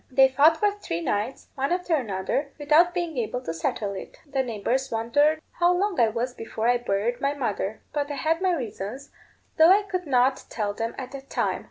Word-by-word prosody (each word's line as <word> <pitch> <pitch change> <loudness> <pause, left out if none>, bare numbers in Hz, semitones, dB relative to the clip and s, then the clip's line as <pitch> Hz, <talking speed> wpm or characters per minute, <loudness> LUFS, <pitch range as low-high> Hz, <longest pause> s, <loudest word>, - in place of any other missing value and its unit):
They 265 +1 +5
fought 295 +5 +5
for 415 +3 +2
three 400 - -5
nights, 210 +9 -2
one 275 +2 -2
after 360 -1 0
another, 235 +2 -2
without 305 +4 +4
being 345 -6 -2
able 240 +2 -2
to 165 - -4
settle 200 +5 -2
it. 190 - -8
The 275 -2 -1
neighbours 250 +2 -1
wondered 290 +8 +2 0.2
how 350 +1 +5
long 395 +1 0
I 230 - +6
was 235 +3 -2
before 225 -1 -3
I 245 0 +3
buried 235 +3 -1
my 280 +1 0
mother; 215 -5 -3
but 290 -1 -1
I 290 - -3
had 320 +4 0
my 370 -2 +2
reasons, 240 - -6 0.5
though 320 +1 +8
I 400 +3 +6
could 365 -4 -4
not 260 0 +2
tell 210 -2 -2
them 225 +2 -4
at 260 -1 -6
that 275 0 -9
time. - - 0
265 Hz, 205 wpm, -25 LUFS, 225-315 Hz, 0.5 s, though